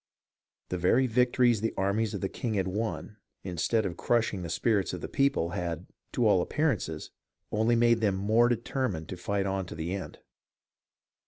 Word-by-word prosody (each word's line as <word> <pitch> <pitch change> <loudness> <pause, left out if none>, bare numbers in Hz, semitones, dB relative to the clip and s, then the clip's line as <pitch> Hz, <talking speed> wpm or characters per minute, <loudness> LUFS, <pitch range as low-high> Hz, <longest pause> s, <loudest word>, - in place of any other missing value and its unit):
The 90 - -2
very 115 +9 +3
victories 125 -1 +3
the 115 - -1
armies 100 +3 0
of 100 - -4
the 95 - 0
king 110 +2 -3
had 95 -1 0
won, 105 +2 -3 0.3
instead 95 +5 0
of 85 -2 -3
crushing 115 -5 +1
the 85 - -5
spirits 95 +2 +1
of - - -5
the - - -4
people, 140 -12 +1
had, 85 0 -3 0.3
to 120 - +1
all 100 -4 +4
appear 150 - +1
ances, 80 -5 -6 0.4
only 110 +2 +2
made 115 -1 +4
them 100 -3 +2
the - - -4
more 115 +3 +4
determined 115 - -2
to - - -4
fight 100 +2 -1
on 95 -1 -2
to - - -7
the 80 +3 -3
end. 100 - -6
105 Hz, 185 wpm, -29 LUFS, 90-115 Hz, 0.4 s, all